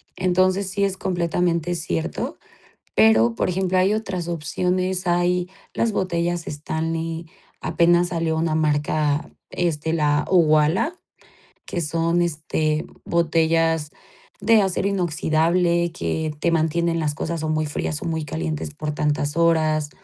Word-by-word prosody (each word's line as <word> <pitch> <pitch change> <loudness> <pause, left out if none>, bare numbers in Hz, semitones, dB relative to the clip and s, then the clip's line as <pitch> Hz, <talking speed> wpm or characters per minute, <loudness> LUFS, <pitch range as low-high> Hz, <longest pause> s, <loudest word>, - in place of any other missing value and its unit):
Entonces 185 +1 +2
sí 200 +1 -1
es 195 -1 +1
completamente 175 -2 0
cierto. 85 - -3 0.6
Pero, 110 +2 +5
por 115 - -1
ejemplo, 185 0 +1
hay 195 +3 +3
otras 190 -6 -3
opciones, 180 +3 -1
hay 175 +1 +1 0.2
las 230 - +1
botellas 175 -3 -1
Stanley, 165 +2 -3 0.4
apenas 175 +1 +3
salió 165 -2 -1
una 160 -1 0
marca, 150 -1 0 0.2
este, 160 -3 -1
la 150 -2 +2
Uwala, 165 - +3 0.7
que - - -3
son, 165 +2 +1
este, 155 -1 -1 0.2
botellas 165 -2 +1 0.5
de 225 -1 +5
acero 190 +1 0
inoxidable 170 -1 +1
que 160 -2 -2
te 170 - +1
mantienen 165 +1 +1
las 150 -2 0
cosas 160 +1 -3
o 155 - -1
muy 155 0 0
frías 150 +1 -3
o - - -5
muy 160 -2 -2
calientes 155 -1 -4
por 150 0 -4
tantas 150 0 -1
horas. 155 -3 +2
165 Hz, 130 wpm, -22 LUFS, 155-175 Hz, 0.7 s, Pero